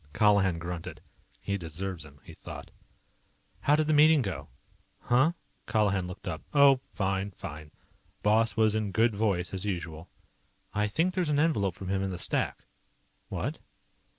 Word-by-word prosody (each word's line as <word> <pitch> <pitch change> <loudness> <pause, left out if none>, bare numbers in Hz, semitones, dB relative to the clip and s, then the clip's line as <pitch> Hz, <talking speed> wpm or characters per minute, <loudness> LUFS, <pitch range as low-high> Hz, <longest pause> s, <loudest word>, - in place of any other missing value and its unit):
Colihan 100 -5 +4
grunted. 85 0 -6 0.4
He 100 0 -2
deserves 85 +1 -4
them, 70 -2 -16
he - - -12
thought. - - -10 0.9
"How 145 - +3
did 155 0 +2
the 155 - +2
meeting 150 -1 +6
go?" 80 -9 -5 0.5
"Huh?" 130 +8 +3 0.3
Colihan 100 -5 +1
looked 90 +1 -9
up. 80 - -3
"Oh, 140 -2 +7
fine, 95 0 -1
fine. 75 -6 -9 0.5
Boss 110 +2 +3
was 110 -1 +4
in 110 -2 -1
good 115 +2 +2
voice, 100 -4 0
as 95 0 -2
usual." 85 -5 -4 0.6
"I 105 0 +1
think 165 - +1
there's 180 -4 0
an 145 -1 +2
envelope 105 - +1
from 95 -1 -7
him 95 0 0
in 95 - -1
the 90 - -4
stack." 85 - -1 0.6
"What?" - - -3
100 Hz, 155 wpm, -29 LUFS, 90-115 Hz, 0.9 s, Oh